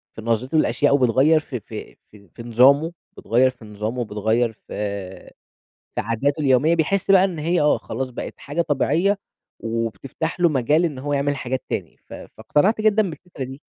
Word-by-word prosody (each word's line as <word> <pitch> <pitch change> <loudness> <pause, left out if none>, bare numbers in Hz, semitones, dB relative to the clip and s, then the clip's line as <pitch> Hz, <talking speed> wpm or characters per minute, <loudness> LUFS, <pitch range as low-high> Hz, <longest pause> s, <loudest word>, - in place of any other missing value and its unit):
في 110 - -8
نظْرِته 115 +7 0
للأشياء 145 -2 +3
وبتغيّر 135 +5 +4
في 130 -5 -6
في - - -9 0.2
في 100 -4 -18
في 115 - -10
نظامه، 135 +7 +4 0.3
بتغيّر 125 +3 +3
في 120 -3 -13
نظامه، 110 +4 -4
بتغيّر 110 +3 0
في 110 - -29 1.3
في - - 0
عاداته 135 +8 -1
اليومية، 140 +4 +3
بيحس 195 +4 0
بقى 190 -1 +7
إن 180 -5 -2
هي 170 +3 +1
آه، 150 - +3
خلاص 130 +3 -5
بقِت - - -6
حاجة 150 +4 -2
طبيعية 165 +6 +1 0.4
وبتفتَح 115 - -4
له 175 - +5
مجال 150 +3 +2
إن 150 -6 -2
هو 145 +2 -3
يعمل 140 0 0
حاجات 130 0 -3
تاني، - - -4
ف - - -20
فاقتنعت 200 +9 0
جدًا 215 -3 +3
بالفكرة 160 -4 -8
دي. 135 +3 -10
140 Hz, 170 wpm, -22 LUFS, 120-160 Hz, 1.3 s, بقى